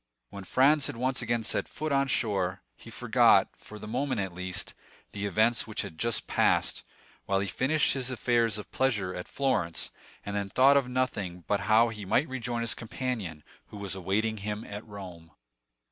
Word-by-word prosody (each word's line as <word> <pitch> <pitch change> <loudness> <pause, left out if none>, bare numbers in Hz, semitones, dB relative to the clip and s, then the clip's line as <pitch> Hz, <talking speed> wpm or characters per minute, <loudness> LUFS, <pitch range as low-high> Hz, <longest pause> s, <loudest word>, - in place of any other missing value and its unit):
When 100 -1 -8
Franz 140 +7 +4
had - - -5
once 130 +2 0
again 120 -1 -1
set - - +1
foot 155 0 -4
on 140 0 +2
shore, 95 -7 0
he - - -13
forgot, - - +4
for 105 - -12
the 105 - -9
moment 130 +1 -1
at 95 -2 -2
least, 90 +1 -4 0.4
the 100 0 -3
events 110 +5 +2
which 110 - -2
had 80 - -9
just 115 -1 +1
passed, - - +2 0.5
while 95 0 +2
he 100 - -1
finished 140 - +2
his 130 -2 -2
affairs 120 -3 +1
of 105 - -8
pleasure 105 -9 0
at 90 - -6
Florence, 110 - 0 0.3
and 100 - -4
then 100 -1 -2
thought 135 +6 +5
of 140 -3 +3
nothing 100 -9 -2
but 100 - +1
how 115 +2 +6
he 110 -2 -7
should 125 +10 +1
rejoin 120 -2 -3
his 115 - +1
companion, 110 - -4 0.2
who - - -10
was 100 -2 -3
awaiting 100 +4 -1
him 105 +1 -4
at 105 +1 -7
Rome. 90 -6 -10
110 Hz, 185 wpm, -29 LUFS, 100-125 Hz, 0.5 s, how